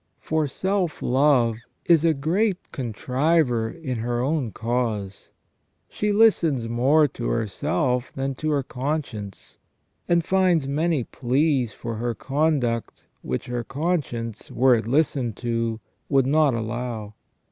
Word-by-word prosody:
For 155 -1 0
self 185 +3 -1
love 125 -4 +3 0.3
is 165 -3 +5
a 165 -2 +3
great 180 +7 0
contriver 125 0 0
in 130 -7 -5
her 120 +1 -1
own 135 -1 0
cause; 110 -4 -3 0.6
she 210 0 -1
listens 170 - +3
more 135 +7 +3
to - - -5
herself 125 - -1
than 135 0 -2
to 155 +4 -3
her 145 -2 +1
conscience, 125 -7 -5 0.5
and 170 -1 +3
finds 185 -6 +2
many 155 0 0
pleas 130 0 0
for 115 +1 -6
her 120 +1 -2
conduct 135 -5 -1 0.2
which 65 - -3
her 120 -1 -3
con 165 +8 0
science, 115 -4 -7
were 130 +1 +4
it 115 -2 0
listened 135 -4 +1
to, 115 -2 -2 0.3
would 135 -3 +3
not 145 -1 +3
allow. 115 -1 -4
130 Hz, 130 wpm, -24 LUFS, 115-155 Hz, 0.6 s, is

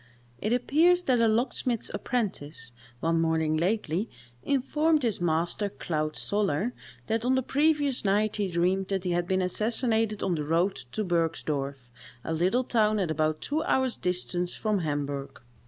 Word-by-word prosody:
It 215 - -1
appears 325 +9 +3
that 255 -7 +2
a 230 - +4
locksmith's 235 +1 0
apprentice, 155 - -3 0.3
one 165 0 +1
morning 160 -1 +1
lately, 185 +2 0 0.3
informed 295 - +1
his 220 -7 0
master 175 +5 0
(Claude 155 -5 -3
Soller) 205 +2 0 0.3
that 225 - -1
on 255 +2 +2
the 260 - +1
previous 290 -1 +2
night 210 +2 +1
he 205 -2 0
dreamed 185 +2 0
that 195 -2 -1
he 180 - -1
had 175 0 0
been 185 0 +1
assassinated 220 +2 0
on 185 - +1
the 155 -3 -2
road 170 +6 +1 0.2
to 215 - -1
Bergsdorff, 150 -7 -2 0.3
a 160 - -3
little 185 +10 +2
town 215 -3 +2
at 185 -5 0
about 155 0 0
two 305 +2 -1
hours' 260 -4 +1
distance 180 0 -2
from 215 -2 0
Hamburgh. 145 -3 -3
195 Hz, 155 wpm, -28 LUFS, 165-235 Hz, 0.3 s, a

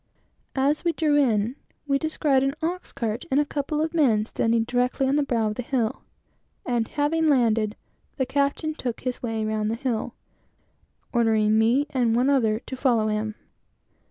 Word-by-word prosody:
As 280 +3 +1
we 340 -1 +1
drew 305 -3 +1
in, 240 -3 +2 0.3
we 275 -1 +1
found 295 -3 +1
an 275 +1 0
ox 355 +3 -3
cart 230 0 -3
and 270 - +3
a 295 - +2
couple 295 +1 -2
of 320 +1 -3
men 235 -10 +3
standing 225 0 +1
directly 250 +3 0
on 270 - +2
the 295 - +3
brow 240 -5 0
of 210 - -2
the 250 - -4
hill; 245 -1 -1 0.6
and 240 -3 0
having 310 +2 0
landed, 225 -6 +2 0.4
the 260 - +1
captain 280 +4 0
took 245 -6 -4
his 255 -1 -3
way 225 -2 -2
round 215 0 -1
the 225 - -1
hill, 240 -2 -3 1.0
ordering 220 -3 +3
me 240 +6 +3
and 240 -4 +1
one 255 +4 +3
other 225 -6 +2
to 260 - -7
follow 240 -5 +2
him. 215 0 -2
250 Hz, 175 wpm, -25 LUFS, 225-285 Hz, 1.0 s, and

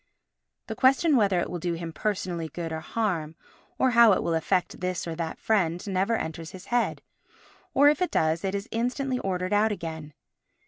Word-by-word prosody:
The - - -5
question 275 +4 +4
whether 200 -6 +3
it - - -2
will 175 - -5
do 175 +1 -2
him 165 -1 -5
personally 175 -4 -2
good 165 -1 -5
or 160 - -3
harm, 165 -5 -2 0.4
or 260 - +3
how 235 -3 +7
it - - 0
will 170 - 0
affect 175 +3 0
this 180 -1 -2
or 165 - -4
that 160 0 -4
friend, 180 -5 0
never 195 +3 0
enters 160 -3 -5
his 185 - -10
head, 245 - 0 0.7
or, 285 +1 +6
if 300 +4 +3
it 360 - +2
does, 160 +1 +1
it 195 0 -1
is 200 +1 -4
instantly 250 +3 -1
ordered 185 -2 -2
out 215 +2 +3
again. 160 -6 -6
185 Hz, 190 wpm, -26 LUFS, 165-225 Hz, 0.7 s, how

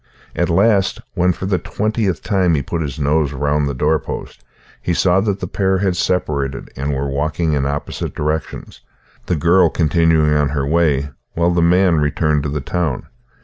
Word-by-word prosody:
At 85 - 0
last, 95 +2 +2
when 90 +1 +2
for 90 - -5
the 95 -2 0
twentieth 105 0 -2
time 95 -5 +2
he 70 - -1
put 85 +3 -3
his 75 -3 -4
nose 75 0 +1
round 70 +1 0
the 70 - -4
doorpost, 75 +3 -2 0.4
he 85 - -1
saw 95 +2 +3
that 100 -1 -2
the 90 - -3
pair 95 +1 0
had 95 -2 0
separated, 75 -8 -1
and 70 +2 -2
were 70 +1 -2
walking 75 +3 -1
in 70 -2 0
opposite 70 +1 -4
directions, 75 +1 -4 0.5
the 90 - +1
girl 85 +5 +4
continuing 80 -1 +2
on 75 -1 +2
her 70 -1 -1
way, 75 -3 +1 0.2
while 85 +1 +1
the 85 0 +1
man 90 0 +4
returned 75 0 +1
to 70 - -3
the 75 0 -3
town. 80 -1 -2
80 Hz, 180 wpm, -18 LUFS, 75-90 Hz, 0.5 s, girl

